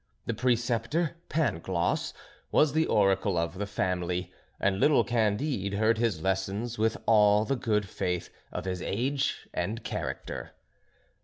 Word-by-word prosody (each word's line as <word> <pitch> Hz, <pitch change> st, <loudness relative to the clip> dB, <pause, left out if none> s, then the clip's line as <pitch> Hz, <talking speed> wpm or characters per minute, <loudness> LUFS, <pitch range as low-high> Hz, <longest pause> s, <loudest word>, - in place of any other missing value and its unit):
The 115 Hz, -, -1 dB
Preceptor 120 Hz, +6 st, +1 dB, 0.2 s
Pangloss 95 Hz, -, 0 dB, 0.4 s
was 150 Hz, -2 st, +4 dB
the 160 Hz, +1 st, +2 dB
oracle 95 Hz, -2 st, +2 dB
of 85 Hz, +3 st, -1 dB
the 105 Hz, -, -2 dB
family, 90 Hz, -2 st, -2 dB, 0.3 s
and 95 Hz, 0 st, +1 dB
little 140 Hz, 0 st, +5 dB
Candide 110 Hz, -1 st, 0 dB
heard 110 Hz, +2 st, +2 dB
his 110 Hz, -9 st, 0 dB
lessons 95 Hz, +5 st, -1 dB
with 110 Hz, +1 st, +2 dB
all 105 Hz, -1 st, +5 dB
the 135 Hz, -, 0 dB
good 105 Hz, -4 st, 0 dB
faith 90 Hz, -1 st, -2 dB, 0.2 s
of -, -, -5 dB
his 90 Hz, -1 st, -3 dB
age 135 Hz, +9 st, -1 dB
and 110 Hz, +3 st, -2 dB
character. -, -, -5 dB
105 Hz, 135 wpm, -29 LUFS, 95-120 Hz, 0.4 s, little